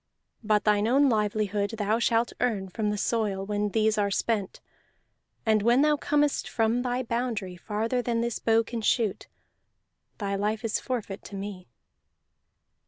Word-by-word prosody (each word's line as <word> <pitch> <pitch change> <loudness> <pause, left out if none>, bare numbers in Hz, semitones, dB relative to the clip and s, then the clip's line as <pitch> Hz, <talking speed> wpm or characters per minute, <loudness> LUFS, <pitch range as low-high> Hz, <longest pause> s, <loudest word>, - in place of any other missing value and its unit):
But 210 -1 +2
thine 210 0 +3
own 275 +3 +4
livelihood 210 -1 0
thou 215 +2 +1
shalt 235 0 +1
earn 210 -6 0
from 210 +3 -2
the 210 - -1
soil 205 -3 -1
when 205 0 -1
these 215 +1 +2
are 200 -1 +2
spent; 205 -1 -1 0.9
and 215 -1 +3
when 240 +6 +4
thou 300 0 +4
comest 295 0 0
from 225 +2 +1
thy 250 0 -1
boundary 230 -6 -2
farther 220 +7 -2
than 235 -1 -1
this 235 -1 -2
bow 225 0 +3
can 230 0 -5
shoot, 215 -2 0 0.9
thy 200 -2 -2
life 210 +3 -1
is 220 - 0
forfeit 225 -6 -4
to 200 - -8
me." 195 -2 -6
220 Hz, 155 wpm, -27 LUFS, 205-235 Hz, 0.9 s, own